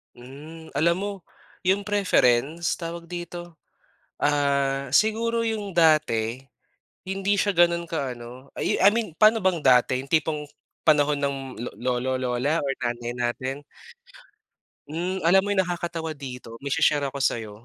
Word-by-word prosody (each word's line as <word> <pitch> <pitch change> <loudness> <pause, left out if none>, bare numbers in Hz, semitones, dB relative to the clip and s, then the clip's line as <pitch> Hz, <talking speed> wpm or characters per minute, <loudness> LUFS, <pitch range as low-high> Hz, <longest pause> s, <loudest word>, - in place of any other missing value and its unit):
Hmm, 150 +6 -12
alam 170 +3 +3
mo 205 - -2 0.6
yung 195 +2 +3
preference 165 - +2
tawag 170 0 -6
dito? 175 -1 -7 0.6
Ah, 140 -2 +1
siguro 230 - +2
yung 215 -3 -2
dati 150 -9 +2 0.6
hindi 195 +1 0
siya 205 0 +1
ganun 170 -1 +3
ka 140 -7 -3
ano 125 +3 -11
I - - 0
I 195 - +8
mean 215 -5 -2
paano 215 +6 +5
bang 185 -6 +1
dati? 125 -1 +4
Yung 135 - -13
tipong 155 -2 0 0.3
panahon 150 -2 +3
ng 140 -1 0 0.4
lolo 125 +1 -1
,lola, 130 +4 0
or 140 -4 -1
nanay 120 -1 -3
natin? 130 +3 -3 1.3
Hmm, 175 +4 -3
alam 185 +3 +6
mo 205 - -5
yung 190 -2 +2
nakakatawa 170 -2 -4
dito 125 -5 -9
may 140 - -5
shi-share 140 +1 +2
ako 135 - -8
sayo. 115 -5 -2
155 Hz, 140 wpm, -25 LUFS, 130-175 Hz, 1.3 s, I